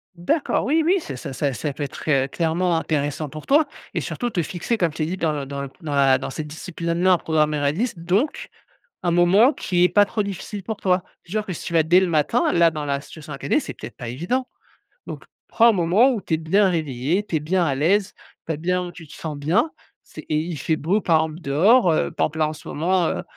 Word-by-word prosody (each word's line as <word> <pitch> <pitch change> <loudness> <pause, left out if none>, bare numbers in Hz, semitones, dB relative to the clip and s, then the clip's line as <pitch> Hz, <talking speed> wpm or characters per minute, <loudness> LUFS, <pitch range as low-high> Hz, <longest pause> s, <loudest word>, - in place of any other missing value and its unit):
D'accord, 225 - 0
oui, 315 +3 +2
oui, 375 +3 +4
c'est 135 - -7
ça 135 +1 -7
ça 140 +1 -1
ça, 145 +2 -3
peut-être, 145 +2 -6
heu, 135 -3 +3
clairement 170 +3 0
intéressant 150 -2 -2
pour 155 +1 -10
toi 300 +3 +5 0.3
et - - 0
surtout 245 -1 -3
te 175 -6 -1
fixer, 185 +8 -2
comme 170 -6 +1
je 160 - -13
t'ai 155 - 0
dit, 185 +2 -3
dans 160 -3 0
le 145 -2 -3
dans 140 0 -5
le 140 - -6
dans 150 -3 -3
la 135 -1 +4
dans - - -5
cette 150 +3 -5
discipline 170 +2 -6
maintenant, 180 +2 +3
en 180 - +4
programmant 155 -2 +1
la 140 0 +2
liste, 215 +4 -2
donc 190 - -1 0.5
un 175 - +1
moment 190 - +5
qui 180 -8 0
est - - +3
pas 205 0 +5
trop 210 - -2
difficile 200 +1 -6
pour 220 +2 -4
toi. 185 -3 +1 0.2
Genre 210 +4 -2
que 185 - -4
si - - -8
tu 170 - -5
vas 165 - +5
dès 175 +4 +5
le 190 - +2
matin, 155 -3 +2
là, 170 -1 +5
dans 150 -2 -5
la 140 -1 -1
situation 150 0 -10
à 135 - -8
caler, 140 - +1
c'est - - -7
peut-être 110 +2 -10
pas 120 - -7
évident. 180 - -2 0.6
Donc, - - -7 0.3
prends 235 +1 +5
un - - +6
moment 195 +8 +4
où 215 - -3
tu 160 - -1
es - - +3
bien 190 +5 +3
réveillé, 155 +3 -1
tu 165 - -1
es - - 0
bien 175 +4 +1
à 140 - 0
l'aise, 190 +8 +1 0.3
tu 165 - -1
as 150 - -3
bien, 180 +3 -1
heu, 175 - -10
tu 165 -2 -12
te - - -12
sens 155 -3 -6
bien. 180 - +1 0.3
C'est - - -11
et 155 - +2
il 165 +1 -3
fait 160 - 0
beau 180 +8 0
par 165 -2 +3
exemple 160 +2 -9
dehors, 180 - +4
heu, - - +1
par - - 0
exemple, 160 +1 -9
là, 155 - +3
en - - -4
ce - - -12
moment 175 +2 +1
heu - - -2
165 Hz, 260 wpm, -22 LUFS, 150-190 Hz, 0.6 s, un